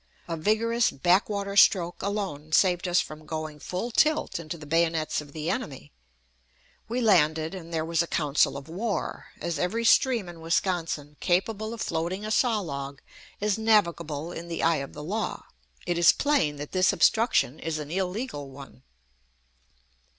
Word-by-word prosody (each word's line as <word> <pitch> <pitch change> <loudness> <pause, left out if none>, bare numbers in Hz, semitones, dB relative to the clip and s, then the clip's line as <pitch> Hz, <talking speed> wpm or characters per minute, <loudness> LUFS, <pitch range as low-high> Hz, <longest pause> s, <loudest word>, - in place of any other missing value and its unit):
A 165 - -2
vigorous 220 +7 +2
back 180 +9 +2
water 200 -1 -3
stroke 175 -3 +4
alone 190 -7 -4
saved 180 0 +3
us 175 0 +3
from 155 0 -6
going 155 -1 -5
full 180 - -4
tilt 305 - +2
into 165 0 -6
the 150 - -11
bayonets 165 0 +1
of 145 -1 -13
the 155 +1 -5
enemy. 130 - -5 1.0
We 245 +2 -1
landed, 160 -6 +3
and 170 -3 -8
there 160 -1 -1
was 165 0 +1
a 170 - -2
council 150 -3 +1
of 140 - -9
war. 200 +6 -3
As 170 -3 -3
every 225 +8 -1
stream 235 -4 +4
in 170 -2 -10
Wisconsin 165 -3 -1
capable 215 +4 0
of 230 - -6
floating 175 +5 -2
a 215 - -3
saw 225 -2 +2
log 140 -5 -6 0.4
is 210 +1 0
"navigable" 170 -8 +1
in 170 -1 -7
the 170 - -3
eye 165 -1 +3
of 140 0 -6
the 150 - -8
law, 210 +8 -3 0.4
it 175 -1 -1
is 170 -1 +8
plain 230 - +1
that 145 0 -7
this 185 0 +3
obstruction 220 - +2
is 160 -1 -3
an 150 0 -6
illegal 185 - -3
one. 135 -1 -12
170 Hz, 165 wpm, -27 LUFS, 155-205 Hz, 1.0 s, is